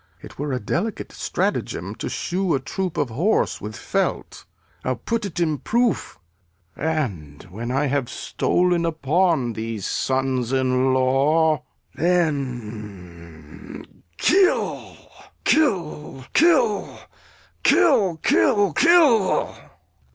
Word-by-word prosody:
It - - -13
were 145 0 -2
a 130 - -1
delicate 185 - -3
stratagem - - -2
to - - -4
shoe 185 -1 -1
A - - 0
troop 180 +6 -4
of 140 -5 -1
horse 175 - 0
with 105 +1 -6
felt. - - -3 0.4
I'll 130 - -1
put't 200 - -3
in 155 -4 0
proof, 235 - 0 0.6
And 105 - -3
when 115 +5 -6
I 135 +4 0
have 140 -1 0
stol'n 175 -1 0
upon 160 -4 +1
these 110 -2 -5
sons 130 -2 -1
in 130 0 +2
law, 140 +5 +2 0.3
Then 105 - -4 0.3
kill, 375 0 +1 0.5
kill, 155 - 0
kill, 295 - +2 0.6
kill, 235 - +3
kill, 200 +2 +2
kill! 305 - +4
150 Hz, 100 wpm, -22 LUFS, 125-185 Hz, 0.6 s, kill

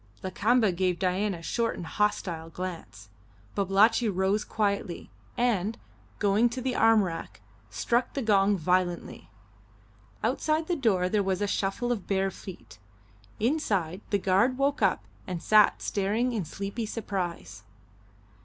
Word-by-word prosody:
Lakamba 215 +3 +2
gave 180 0 0
Dain 190 +2 0
a 165 - -11
short 230 +5 -1
and 175 - -6
hostile 170 -5 -1
glance. 165 - -7 0.4
Babalatchi 205 +4 +3
rose 195 +2 +1
quietly, 200 - -2 0.3
and, 225 -3 +1 0.4
going 210 +3 +3
to 245 +2 -5
the 255 0 -1
arm 225 -2 +5
rack, 165 - -6 0.3
struck 235 - 0
the 275 - -1
gong 200 -2 +3
violently. 180 - -1 0.9
Outside 310 +7 0
the 350 - 0
door 210 - +2
there 205 +2 +1
was 190 -1 -1
a 205 - +1
shuffle 200 +5 -1
of 220 -6 -3
bare 195 -1 +1
feet; 115 - -11 0.6
inside, 205 - 0
the 200 - +2
guard 200 +7 +2
woke 280 +1 0
up - - +2 0.2
and 180 -2 -3
sat 210 +4 +4
staring 215 +5 0
in 210 -6 -2
sleepy 200 +7 -4
surprise. 175 - -4
200 Hz, 135 wpm, -28 LUFS, 185-225 Hz, 0.9 s, arm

